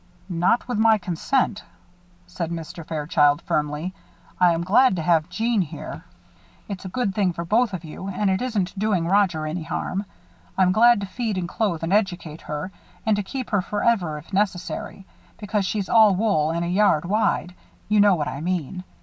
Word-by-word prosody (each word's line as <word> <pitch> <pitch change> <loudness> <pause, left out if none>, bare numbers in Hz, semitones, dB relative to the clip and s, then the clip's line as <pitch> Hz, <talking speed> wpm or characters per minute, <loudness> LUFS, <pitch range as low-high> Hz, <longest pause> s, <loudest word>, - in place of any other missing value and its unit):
"Not 180 +8 +1
with 245 -4 -2
my 220 0 +5
consent," 200 +5 -1 0.6
said 180 -2 -5
Mr. 165 0 -6
Fairchild, 150 -2 +2
firmly. 150 +4 -2 0.5
"I 180 -1 +5
am 165 0 -1
glad 235 +5 +4
to 165 - -3
have 160 -2 +2
Jeanne 230 -2 0
here. 165 - -7 0.6
It's 195 -3 -6
a - - -4
good 205 0 -1
thing 190 -3 +1
for 170 0 -5
both 225 +5 +2
of 185 -3 -5
you 165 +4 -8
and 200 +2 -1
it 190 +3 +1
isn't 205 -7 -2
doing 200 -5 +1
Roger 185 -5 +2
any 160 +3 -3
harm. 180 +4 -3 0.5
I'm 185 -1 +4
glad 235 +2 +5
to - - -2
feed 220 0 -3
and 180 -2 -2
clothe 175 -4 -1
and 165 +4 0
educate 175 -6 -1
her; 150 +5 -5 0.3
and 220 -1 +3
to 205 - -1
keep 255 +6 -6
her 205 -3 +2
forever 200 -5 0
if 155 +6 -13
necessary; 190 -1 -2 0.3
because 205 -2 -1
she's 200 -2 -2
all 215 -4 +6
wool 180 -7 +1
and 170 +1 -1
a - - -2
yard 180 -4 +3
wide 190 -2 0 0.3
you 210 0 +3
know 205 -2 +6
what 150 -3 -2
I 140 - -5
mean. 180 0 -3
185 Hz, 185 wpm, -23 LUFS, 170-210 Hz, 0.6 s, all